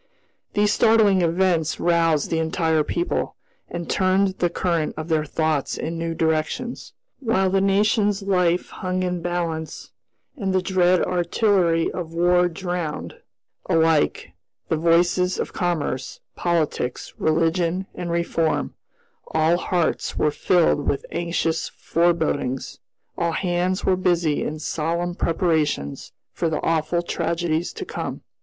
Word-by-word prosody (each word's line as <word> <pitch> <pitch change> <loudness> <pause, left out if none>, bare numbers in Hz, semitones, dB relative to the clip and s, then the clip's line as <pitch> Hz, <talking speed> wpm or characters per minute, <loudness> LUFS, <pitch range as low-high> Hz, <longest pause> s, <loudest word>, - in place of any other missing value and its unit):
These 210 0 +3
startling 220 -4 +4
events 170 -1 +1
roused 165 -3 +2
the 165 - +1
entire 160 -1 +1
people, 345 - -2 0.3
and 175 -1 -5
turned 190 +1 +2
the 175 - +2
current 170 -2 -1
of 155 +2 -5
their 155 -1 +1
thoughts 155 -1 -1
in 165 +1 -4
new 165 0 -2
directions. 160 +11 -2 0.3
While 190 -7 +1
the 195 0 +2
nation's 205 +1 +2
life 180 -3 +1
hung 185 0 -2
in 180 0 -1
the - - -7
balance, 165 -2 -3 0.4
and 195 -8 -2
the 185 - +3
dread 180 -1 +3
artillery 175 -1 +2
of 165 -2 -6
war 175 +1 +4
drowned, 175 -2 -4 0.5
alike, 160 -2 +2 0.4
the - - +2
voices 175 +3 +2
of - - -3
commerce, 160 -7 -2 0.2
politics, 160 -7 -1
religion, 165 +3 +1
and 175 -1 -5
reform, 170 -1 0 0.6
all 160 +2 +3
hearts 175 -2 -1
were 150 - +2
filled 165 -2 +2
with 140 - -1
anxious 170 -1 -1
forebodings, 160 -6 -1 0.4
all 170 -1 0
hands 180 +1 0
were 190 - +3
busy 175 -4 +1
in 155 - -3
solemn 170 +3 -2
preparations 160 - -1 0.2
for 165 - -1
the 155 - -1
awful 165 +1 +1
tragedies 170 -1 -1
to - - -6
come. - - -5
170 Hz, 130 wpm, -23 LUFS, 160-185 Hz, 0.6 s, startling